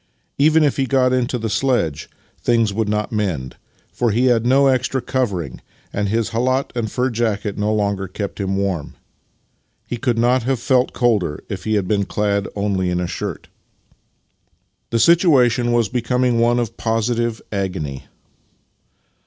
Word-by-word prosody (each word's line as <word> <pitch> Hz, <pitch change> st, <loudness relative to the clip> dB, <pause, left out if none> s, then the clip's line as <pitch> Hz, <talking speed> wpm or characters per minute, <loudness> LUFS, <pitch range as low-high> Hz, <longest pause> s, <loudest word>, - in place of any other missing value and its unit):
Even 155 Hz, +2 st, +5 dB
if 145 Hz, -, +1 dB
he 135 Hz, -1 st, 0 dB
got 130 Hz, -1 st, +2 dB
into 125 Hz, 0 st, 0 dB
the 115 Hz, -1 st, -3 dB
sledge, 115 Hz, -, 0 dB, 0.3 s
things 115 Hz, -4 st, +2 dB
would 110 Hz, 0 st, -1 dB
not 105 Hz, +2 st, -1 dB
mend, 90 Hz, -, -2 dB, 0.4 s
for 120 Hz, -, +1 dB
he 120 Hz, +4 st, +2 dB
had 120 Hz, -2 st, +3 dB
no 135 Hz, +2 st, +4 dB
extra 130 Hz, 0 st, +1 dB
covering, 100 Hz, -, -2 dB, 0.3 s
and 100 Hz, 0 st, -1 dB
his 115 Hz, +1 st, 0 dB
kJialat 130 Hz, +4 st, 0 dB
and 110 Hz, -3 st, -2 dB
fur 130 Hz, 0 st, 0 dB
jacket 110 Hz, -3 st, -1 dB
no 105 Hz, +1 st, 0 dB
longer 100 Hz, -2 st, 0 dB
kept 100 Hz, +3 st, -6 dB
him 95 Hz, -1 st, -1 dB
warm. 95 Hz, -6 st, -2 dB, 0.9 s
He 120 Hz, -, -4 dB
could 120 Hz, -1 st, 0 dB
not 125 Hz, +2 st, +3 dB
have 130 Hz, +1 st, -1 dB
felt 125 Hz, +1 st, +2 dB
colder 105 Hz, -, 0 dB
if 95 Hz, -3 st, -5 dB
he 110 Hz, 0 st, +1 dB
had 100 Hz, -3 st, 0 dB
been 100 Hz, -1 st, +1 dB
clad 100 Hz, -1 st, -1 dB
only 100 Hz, -3 st, 0 dB
in 90 Hz, 0 st, 0 dB
a 90 Hz, -, -1 dB
shirt. -, -, -5 dB, 1.4 s
The 115 Hz, -, 0 dB
situation 125 Hz, -, +4 dB
was 120 Hz, -2 st, +2 dB
becoming 125 Hz, +2 st, 0 dB
one 120 Hz, +1 st, +3 dB
of 115 Hz, -2 st, -2 dB
positive 115 Hz, 0 st, -1 dB
agony. 90 Hz, -9 st, -3 dB
115 Hz, 160 wpm, -20 LUFS, 100-125 Hz, 1.4 s, Even